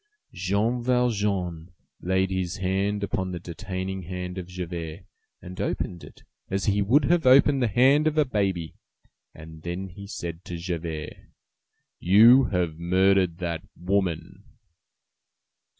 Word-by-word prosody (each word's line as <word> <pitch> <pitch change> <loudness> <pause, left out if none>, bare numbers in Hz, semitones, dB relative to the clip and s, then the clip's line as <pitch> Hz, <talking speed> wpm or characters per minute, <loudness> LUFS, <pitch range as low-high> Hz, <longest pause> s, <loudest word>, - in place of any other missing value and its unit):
Jean 100 +7 0
Valjean 100 -9 0 0.3
laid 95 +1 0
his 95 0 -2
hand 100 +2 -1
upon 95 -2 -2
the 90 - -5
detaining 95 +1 -5
hand 90 +1 -5
of 90 - -7
Javert, 85 -3 -6 0.4
and 90 +1 -7
opened 85 -2 -3
it - - -14 0.3
as 95 0 -1
he 100 0 +2
would 130 +8 +3
have 170 -4 +2
opened 135 +1 +6
the 120 - +3
hand 135 +8 +4
of 155 0 0
a 150 - +4
baby; 95 - -1 0.6
then 80 +4 -7
he 100 +3 -11
said 85 -3 -6
to 85 - -5
Javert:— 85 -3 -5 0.7
"You 115 +8 +7
have 85 -4 -1
murdered 95 0 +2
that 85 -2 -3 0.2
woman." 90 -2 -2
95 Hz, 130 wpm, -25 LUFS, 85-105 Hz, 0.7 s, You